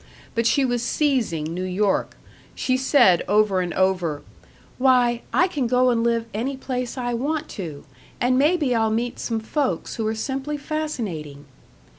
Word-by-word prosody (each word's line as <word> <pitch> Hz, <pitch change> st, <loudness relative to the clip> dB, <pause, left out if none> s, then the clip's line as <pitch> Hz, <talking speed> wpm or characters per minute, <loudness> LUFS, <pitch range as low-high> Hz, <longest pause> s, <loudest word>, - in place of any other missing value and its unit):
But 230 Hz, -1 st, +1 dB
she 275 Hz, +3 st, +3 dB
was 245 Hz, -2 st, 0 dB
seizing 245 Hz, -, 0 dB
New 180 Hz, -, -4 dB
York. 190 Hz, +2 st, 0 dB, 0.4 s
She 255 Hz, -, 0 dB
said 255 Hz, -, +4 dB
over 205 Hz, -1 st, +3 dB
and 175 Hz, -1 st, -3 dB
over, 180 Hz, -6 st, 0 dB, 0.6 s
"Why, 250 Hz, -2 st, +3 dB
I 360 Hz, -, +4 dB
can 285 Hz, -8 st, -1 dB
go 250 Hz, +1 st, +3 dB
and 230 Hz, -1 st, +1 dB
live 230 Hz, -1 st, +1 dB
any 260 Hz, +6 st, -2 dB
place 250 Hz, -1 st, -4 dB
I 245 Hz, -1 st, -2 dB
want 290 Hz, +6 st, -2 dB
to, 160 Hz, -7 st, -7 dB, 0.4 s
and 250 Hz, +1 st, +2 dB
maybe 295 Hz, -1 st, +2 dB
I'll 225 Hz, -1 st, +2 dB
meet 235 Hz, +2 st, -2 dB
some 225 Hz, -2 st, -2 dB
folks 265 Hz, +5 st, -2 dB
who 220 Hz, -2 st, -1 dB
are 220 Hz, -, -1 dB
simply 270 Hz, +5 st, -3 dB
fascinating." 215 Hz, -, -4 dB
240 Hz, 160 wpm, -23 LUFS, 205-265 Hz, 0.6 s, said